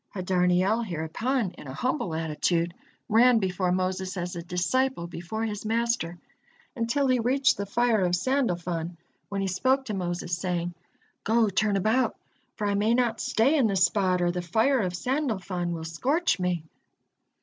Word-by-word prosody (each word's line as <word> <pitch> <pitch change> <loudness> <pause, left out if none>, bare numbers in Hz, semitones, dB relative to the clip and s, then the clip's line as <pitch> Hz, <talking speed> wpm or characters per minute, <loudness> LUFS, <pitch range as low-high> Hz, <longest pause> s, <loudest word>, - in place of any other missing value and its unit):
Hadarniel 185 +3 +2
hereupon, 195 - -2
in - - -10
a 130 - -7
humble 250 - -1
attitude, 165 +2 0 0.3
ran 235 +2 +5
before 185 -3 0
Moses 185 +1 -1
as 175 0 -3
a 170 - -4
disciple 180 +6 0
before 175 +6 -5
his 210 -2 -4
master, 225 -6 -1 0.6
until 235 +4 0
he 255 -1 +3
reached 265 +4 +3
the 200 0 -4
fire 230 -1 +2
of 180 0 +2
Sandalfon, 175 -8 -1 0.3
when 200 -1 -2
he 195 - 0
spoke 260 +9 +1
to 215 - -4
Moses, 175 -2 -2
saying: 175 -1 -2 0.5
"Go, 225 0 +3
turn 200 +1 +1
about, 220 +5 +1 0.4
for 210 - -3
I 205 - +1
may 215 +3 +2
not 240 -2 +1
stay 255 +8 +2
in 265 -7 +4
this 190 -3 +4
spot, 185 -1 +1
or 175 - +2
the 180 0 -3
fire 225 +10 +2
of 180 -4 -1
Sandalfon 190 - -2
will 165 -1 -4
scorch 270 - 0
me." 180 -3 -1
195 Hz, 160 wpm, -27 LUFS, 175-235 Hz, 0.6 s, ran